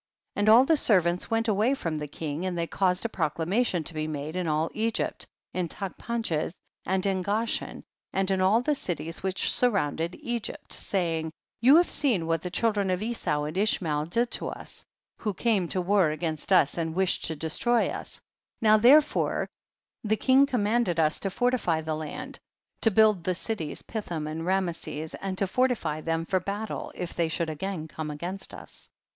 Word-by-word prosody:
16. - - -7
And 210 - +4
all 235 +4 +8
the 320 - +4
servants 180 - +3
went 225 0 +1
away 220 +6 +2
from 165 - -3
the 150 0 -4
king, 150 +2 -5
and 185 -2 -2
they 170 - 0
caused 180 +3 +1
a - - +3
proclamation 175 - 0
to 165 - -4
be 155 0 -2
made 155 +1 -5
in 180 -2 -1
all 155 +1 0
Egypt, 225 +1 -1 0.3
in 180 -2 -1
Taclipanches 190 -3 -3 0.3
and 190 +1 +1
in 190 -2 +1
Gosh 210 +5 0
en, - - -9 0.3
and 195 0 0
in 190 -1 +1
all 200 +5 +4
the 300 - +2
cities 165 - -2
which 190 0 +1
sur 250 - +4
rounded 170 -4 -1
Egypt, 240 -2 -4
saying, 165 -4 -1
17. - - -7 0.3
You 260 +5 +7
have 345 +2 +4
seen 225 - +1
what 165 -1 0
the 180 - -4
child 215 +4 0
ren 200 -2 +1
of 185 +2 0
Esau 215 -10 -1
and 150 +2 -4
Ishmacl 165 -6 0
did 235 +6 +1
to - - -3
us, - - -7 0.4
who 210 -3 -2
came 205 -4 +1
to 185 - -2
war 185 -2 +3
against 155 0 -3
us 145 +4 +4
and 165 -1 -2
wish 190 0 +2
ed - - -12
to 160 - -3
destroy 235 - +1
us; - - -6
18. - - -13 0.4
Now 215 -1 +6
therefore 280 +7 +4 0.6
tlie 215 0 +1
king 265 +3 +5
com 245 -6 0
manded 215 -5 +1
us 155 -1 +3
to 195 - -2
fortify 200 -6 +1
the 160 0 -3
land, 155 -1 -6 0.4
to 225 - +5
build 215 -3 +4
the 185 +1 0
cities 180 -6 -3
Pithom 175 -9 -4
and 160 +2 -4
Rameses, 170 -4 -2
and 190 -1 -4
to 195 - +2
fortify 190 -8 0
them 165 +1 -1
for 185 +2 +1
battle, 200 +4 -4
if 175 -1 -5
they 170 - 0
should 160 0 -1
again 160 +1 -4
come 155 0 -6
against 175 +6 -3
us. - - -11
185 Hz, 200 wpm, -27 LUFS, 160-220 Hz, 0.6 s, all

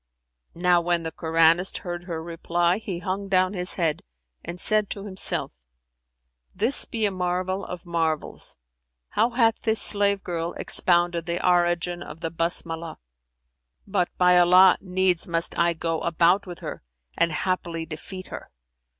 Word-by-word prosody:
'" 60 0 -56
Now 175 0 +3
when 170 0 -1
the 160 - -4
Koranist 165 +3 +2
heard 175 0 -5
her 165 -3 -5
reply, 170 +2 -1
he 200 -5 -5
hung 190 +2 -4
down 185 0 +2
his 180 -1 0
head 165 -4 -1 0.4
and 175 +1 -7
said 215 +2 +3
to 200 0 -6
himself, 190 -2 0 1.0
"This 235 +7 +2
be 225 -2 -2
a 205 - 0
marvel 185 +1 -2
of 180 -1 -8
marvels! 165 -2 -2 0.5
How 225 +3 +1
hath 230 -2 +1
this 220 -1 +1
slave 200 -1 +3
girl 170 -1 -3
expounded 175 -1 +2
the 170 +1 -2
origin 175 0 +1
of 165 -1 -10
the 165 - -3
Basmalah? 165 -1 -1 0.9
But, 190 -3 0
by 180 0 +5
Allah, 180 +1 +6
needs 185 -2 0
must 170 0 -1
I 170 0 +2
go 165 0 -3
a 170 - -2
bout 175 +4 +2
with 175 -1 -9
her - - -7 0.3
and 170 - +2
haply 170 0 -3
defeat 175 +4 -9
her." - - -9
175 Hz, 155 wpm, -24 LUFS, 170-190 Hz, 1.0 s, Allah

